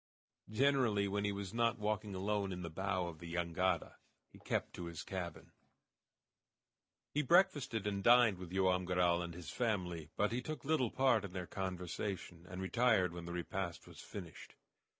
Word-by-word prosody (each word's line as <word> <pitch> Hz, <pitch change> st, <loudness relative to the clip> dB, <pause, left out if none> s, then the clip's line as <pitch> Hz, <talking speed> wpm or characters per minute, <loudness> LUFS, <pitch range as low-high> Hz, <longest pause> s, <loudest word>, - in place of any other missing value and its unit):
Generally, 115 Hz, -4 st, +3 dB
when 100 Hz, +1 st, 0 dB
he 100 Hz, -, +1 dB
was 100 Hz, -1 st, -5 dB
not 115 Hz, 0 st, +2 dB
walking 105 Hz, -1 st, -2 dB
alone 100 Hz, +1 st, 0 dB
in 90 Hz, -1 st, -4 dB
the 85 Hz, -, -5 dB
bow 95 Hz, +1 st, -1 dB
of 85 Hz, -2 st, -7 dB
the 85 Hz, 0 st, -8 dB
jangada, 85 Hz, 0 st, 0 dB, 0.4 s
he -, -, -14 dB
kept -, -, -2 dB
to 85 Hz, -, -6 dB
his 85 Hz, -1 st, -6 dB
cabin. 90 Hz, -4 st, -5 dB, 1.6 s
He 150 Hz, -, +2 dB
breakfasted 145 Hz, -, +3 dB
and 100 Hz, -1 st, -1 dB
dined 120 Hz, -5 st, +6 dB
with 90 Hz, -2 st, -8 dB
Joam 95 Hz, -1 st, +2 dB
Garral 90 Hz, -1 st, +3 dB
and 85 Hz, -1 st, -5 dB
his 85 Hz, -2 st, -7 dB
family, 90 Hz, -9 st, -1 dB
but 105 Hz, +1 st, +2 dB
he 120 Hz, +2 st, -1 dB
took 150 Hz, -1 st, -6 dB
little 140 Hz, -5 st, +2 dB
part 130 Hz, -4 st, +3 dB
in 95 Hz, -3 st, -6 dB
their 90 Hz, -1 st, -3 dB
conversation, 90 Hz, -1 st, -4 dB
and 90 Hz, +1 st, -5 dB
retired 105 Hz, -4 st, +3 dB
when 85 Hz, -1 st, -6 dB
the 85 Hz, -, -5 dB
repast 85 Hz, 0 st, -3 dB
was -, -, -13 dB
finished. -, -, -9 dB
95 Hz, 170 wpm, -36 LUFS, 90-110 Hz, 1.6 s, dined